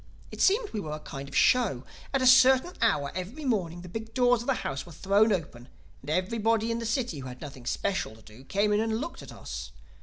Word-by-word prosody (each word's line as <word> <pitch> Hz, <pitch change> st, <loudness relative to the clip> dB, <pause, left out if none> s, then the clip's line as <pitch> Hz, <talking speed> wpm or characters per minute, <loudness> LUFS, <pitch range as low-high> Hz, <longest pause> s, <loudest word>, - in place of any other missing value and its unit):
It -, -, -6 dB
seemed 420 Hz, +3 st, +3 dB
we 215 Hz, -, -3 dB
were 155 Hz, -6 st, -5 dB
a 155 Hz, -, -5 dB
kind 140 Hz, -2 st, -8 dB
of -, -, -9 dB
a -, -, +2 dB
show. 220 Hz, -, +3 dB, 0.3 s
At 270 Hz, -2 st, +1 dB
a -, -, +3 dB
certain 260 Hz, +5 st, +6 dB
hour 145 Hz, -11 st, +2 dB
every 205 Hz, -, -6 dB
morning 180 Hz, -9 st, -1 dB
the 180 Hz, -, -10 dB
big 220 Hz, +4 st, -7 dB
doors 245 Hz, -2 st, +4 dB
of 240 Hz, -, -8 dB
the 270 Hz, -, +2 dB
house 135 Hz, -1 st, -3 dB
were 175 Hz, -, -13 dB
thrown 200 Hz, +7 st, +3 dB
open 145 Hz, -10 st, -3 dB, 0.3 s
and 135 Hz, -, -10 dB
everybody 225 Hz, +6 st, +1 dB
in 230 Hz, -, -1 dB
the 230 Hz, -, -3 dB
city 230 Hz, -, -1 dB
who 130 Hz, -, -7 dB
had 125 Hz, 0 st, -9 dB
nothing 135 Hz, -5 st, -9 dB
special 190 Hz, -, -1 dB
to 110 Hz, -, -18 dB
do 110 Hz, +4 st, -15 dB
came 205 Hz, +7 st, +1 dB
in 205 Hz, -, +3 dB
and 220 Hz, 0 st, 0 dB
looked 330 Hz, +6 st, -6 dB
at -, -, -10 dB
us. -, -, -7 dB
210 Hz, 245 wpm, -28 LUFS, 150-240 Hz, 0.3 s, certain